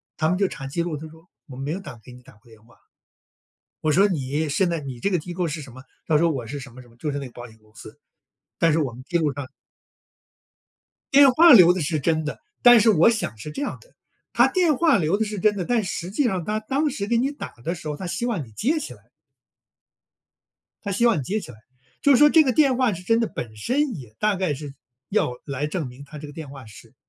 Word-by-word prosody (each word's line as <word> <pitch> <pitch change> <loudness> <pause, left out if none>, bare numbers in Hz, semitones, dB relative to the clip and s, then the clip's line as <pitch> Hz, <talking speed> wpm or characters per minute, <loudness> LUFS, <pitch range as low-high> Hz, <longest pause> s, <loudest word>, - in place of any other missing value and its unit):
它 155 0 0
们 180 - +1
就 195 -1 +2
查 135 - -8
记 155 +5 -3
录， 170 -2 -3
它 155 +2 -8
说：” 160 +3 -19 0.2
我 130 -2 -10
没 140 +3 -4
有 190 - -4
打 125 - -10
给 125 - -14
你 125 - -14
打 - - -17
过 110 +2 -24
电 110 -1 -19
话。 115 0 -23 1.0
“我 155 - 0
说： 195 +7 +5
“你 150 -3 -2
现 175 +5 +1
在 170 - -1
你 130 -4 -8
这 200 - 0
个 180 - +1
机 175 +3 -7
构 175 -2 -1
是 155 +1 -5
什 135 -4 -11
么？” 130 +1 -12 0.2
它 155 - +3
说 165 +2 +3
“我 125 -6 -4
是 140 +3 -6
什 135 -3 -11
么 130 +1 -12
什 120 - -19
么“， 115 - -22
就 150 - -3
是 145 - -3
那 140 - -6
个 120 - -13
保 120 0 -10
险 110 0 -19
公 110 0 -27
司， 110 +5 -13 0.6
“但 165 -2 +3
是 165 - +2
我 135 -5 -1
们 125 +2 -11
记 175 - +1
录 150 -3 +1
上” 140 -2 -6 1.7
电 275 -1 +7
话 330 +3 +7
留 180 -5 +8
的 185 - -3
是 155 +1 -1
真 160 +2 0
的， 150 - -5 0.2
但 240 -1 +8
是 220 +1 +5
我 170 +4 +5
想 215 - -2
是 150 - -8
这 285 - -6
样 - - -4
的， - - -23 0.4
它 - - +4
电 345 -6 +2
话 320 -6 +4
留 165 +5 +1
的 220 - 0
是 210 -2 -5
真 210 +2 +2
的， 180 - -2
但 235 -3 +1
实 180 0 -5
际 270 +6 0
上 185 -7 -1
它 215 +1 -1
当 275 +7 -1
时 200 -5 -4
给 235 0 +1
你 270 +4 +1
打 290 - -8
的 170 - -2
时 160 -3 -9
候， 150 -1 -4
它 190 - -7
希 235 +7 -3
望 180 - -2
你 110 - -17
接 290 - 0
起 305 - -7
来 - - -22 1.7
它 200 - -3
希 235 +5 +1
望 230 -7 +4
你 - - -4
接 210 +10 -2
起 125 - -10
来， 110 - -16 0.4
就 285 - +4
是 255 - +6
说 295 +2 +7
这 320 0 +6
个 260 - +1
电 275 -5 +3
话 250 -5 +2
是 180 +1 -8
真 225 +4 +2
的 230 - 0
本 110 -3 -7
身 255 - -1
也 115 -6 -11
大 210 -1 +1
概 185 -5 -1
是， 140 0 -8 0.4
要 195 -11 +1
来 140 +1 -3
证 155 -3 -3
明 125 +3 -12
它 150 +2 -11
这 150 0 -8
个 145 - -11
电 155 -3 -8
话 135 -3 -11
是 105 - -15
165 Hz, 290 characters per minute, -23 LUFS, 140-215 Hz, 1.7 s, 留